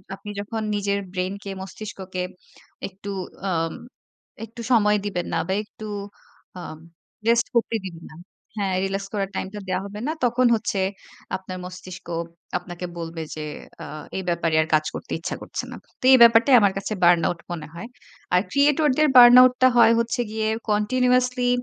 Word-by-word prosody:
আপনি 205 - -11
যখন 215 +2 -4
নিজের 200 0 0
ব্রেইনকে 195 +2 -4
মস্তিষ্ককে 190 -2 -6 0.6
একটু 195 +1 -10 0.4
আ - - 0 1.0
একটু 230 +1 -11
সময় 210 -3 +4
দিবেন 180 -4 -2
না - - +1
বা 190 - 0
একটু 215 0 -12 0.7
আ - - -6 0.7
রেস্ট 235 0 +3
করতে 230 -1 +1
দিবেন 170 -3 -8
না। - - -13 0.4
হ্যাঁ, 195 -2 0
রিল্যাক্স 195 0 -3
করার 200 -2 -1
টাইমটা 200 +2 -4
দেয়া 185 0 0
হবে 205 +1 -8
না। - - 0
তখন 245 +1 +2
হচ্ছে 210 -2 -2 0.6
আপনার 185 -1 -8
মস্তিষ্ক 185 0 -10 0.5
আপনাকে 175 0 -7
বলবে 165 -1 -5
যে 155 - -5 0.4
আ - - -7 0.3
এই 190 - -3
ব্যাপারে 170 -2 0
আর 155 - -2
কাজ 155 0 +3
করতে - - -8
ইচ্ছা 165 - -4
করছে - - -5
না। - - -7 0.3
তো - - -14
এই - - +9
ব্যাপারটাই 235 +3 +6
আমার 200 -2 +3
কাছে 195 +2 -3
বার্ন 175 -1 +6
আউট 170 - -4
মনে 165 -3 -5
হয়। 170 +7 -7 0.5
আর 180 - +5
ক্রিয়েটরদের 295 +1 +3
বার্ন 245 0 +10
আউটটা 255 0 +4
হয় 230 -1 +7
হচ্ছে 235 +2 0
গিয়ে 220 0 -1 0.2
কন্টিনিউয়াসলি 250 +3 +2
200 Hz, 160 wpm, -23 LUFS, 185-235 Hz, 1.0 s, বার্ন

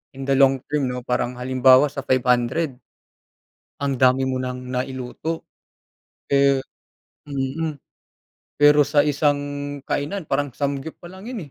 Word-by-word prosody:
in 135 - -6
the 135 - +3
long-term, 135 +1 +2
'no? 125 0 -4
Parang 125 0 -1
halimbawa 130 +2 +5
sa 140 - -5
500 130 +3 +1 1.0
ang 140 -1 -1
dami 130 +1 +3
mo 130 - -1
nang 125 0 -4
nailuto, 130 +5 -4 0.9
eh 140 0 +4 0.7
mm. 145 +3 -3 0.9
Pero 145 0 +7
sa 145 0 +3
isang 145 0 +2 0.5
kainan 170 +8 -2
parang 145 -4 -1
samgyup 140 +2 -3
palang 190 +4 -11
yun 215 - -6
135 Hz, 120 wpm, -22 LUFS, 130-145 Hz, 1.0 s, Pero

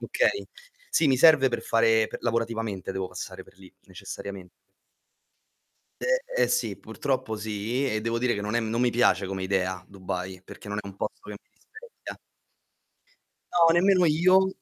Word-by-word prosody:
Okay. - - 0 0.4
Sì, 160 - +3
mi 130 - +4
serve 145 -2 +6
per - - -2
fare 115 -1 +3
per - - -7
lavorativamente 115 -4 -2
devo 95 -1 -3
passare 90 0 -7
per - - -21
lì 95 -1 -15
necessariamen 95 0 -8 1.5
Ehm, - - 0
ehm, - - +5
sì, 480 - 0
purtroppo 130 -5 -3
sì. 110 +5 -2
E 110 -3 -1
devo 115 +1 -1
dire 125 0 +1
che 100 - -4
non 105 +2 -3
è 120 - +2
non 115 +1 -2
mi 125 0 +3
piace 120 -4 +2
come 95 0 -4
idea 95 -1 -1
Dubai, 95 -1 -6
perché 100 - -12
non 105 0 -3
è 105 - -12
un 100 -1 -10
posto - - -5
che 105 - -7
mi - - -45
rispecchia. 465 +2 -12 1.4
No, 165 -1 +5
nemmeno 185 +1 +4
io, 185 +5 +4
115 Hz, 170 wpm, -26 LUFS, 100-150 Hz, 1.5 s, serve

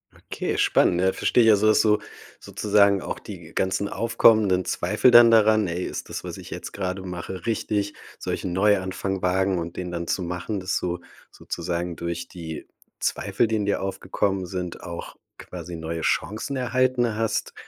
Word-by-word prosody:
Okay, - - -4
spannend. 85 - +3
Äh, 95 0 +3
versteh 125 - +2
ich 115 - +5
also, 105 0 +4
dass 110 - +5
du 105 -1 +4 0.4
sozusagen 100 -2 +2
auch - - -5
die - - -10
ganzen 95 +2 0
aufkommenden 110 -5 +3
Zweifel 125 - +2
dann 120 -1 +9
daran 110 -2 +5
„Ey, 85 +1 -3
ist - - -5
das, - - -5
was - - -6
ich - - -10
jetzt - - -6
grade 95 -1 -3
mache 90 0 -6
richtig? 105 -2 -1 0.2
Soll - - -4
ich - - -4
'nen 90 - -2
Neuanfang 95 -1 +1
wagen?“ 95 0 +1
Und 85 0 -6
den 90 -1 -5
dann 85 -1 -4
zu 95 - -1
machen, 90 +4 -3
dass 95 +1 -1
du 90 -1 -3 0.3
sozusagen 85 0 -4
durch 85 0 -4
die 80 -3 -8 0.3
Zweifel, 115 - 0
die 110 0 0
in 105 - -1
dir 100 - 0
aufgekommen 95 0 -2
sind, 90 -1 -5
auch 85 -2 -7 0.2
quasi 90 -1 -8
neue 80 0 -4
Chancen 110 +11 -1
erhalten 125 -2 +1
hast, 110 0 -1
95 Hz, 175 wpm, -24 LUFS, 90-110 Hz, 0.4 s, dann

